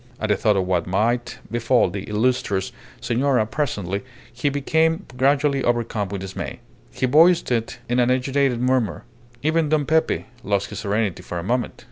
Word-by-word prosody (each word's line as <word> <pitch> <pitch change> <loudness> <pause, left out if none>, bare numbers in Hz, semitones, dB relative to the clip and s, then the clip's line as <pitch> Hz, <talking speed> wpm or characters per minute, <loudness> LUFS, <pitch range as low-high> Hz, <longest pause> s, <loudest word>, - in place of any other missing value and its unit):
At 110 - -2
the 105 - +4
thought 105 +1 +2
of 95 - +1
what 90 -2 0
might 115 +6 0
befall 120 -3 +2
the 100 +1 -5
illustrious 105 -3 0 0.3
senora 125 -1 +1
presently, 105 - -2 0.3
he 125 +5 0
became 160 +5 +1
gradually 140 +1 +2
overcome 115 -4 0
with 100 -1 -5
dismay. 95 0 -6 0.3
He - - -2
voiced 165 +4 +4
it 115 0 -1
in 120 +1 +1
an 120 0 +3
agitated 130 0 +1
murmur. 125 -9 0 0.4
Even 155 0 +2
Don 150 -1 +2
Pepe 160 +2 +1 0.2
lost 100 -2 -1
his 105 - -5
serenity 105 -3 -1
for 90 - -6
a 85 - -3
moment. 120 +5 -1
120 Hz, 165 wpm, -22 LUFS, 100-140 Hz, 0.4 s, the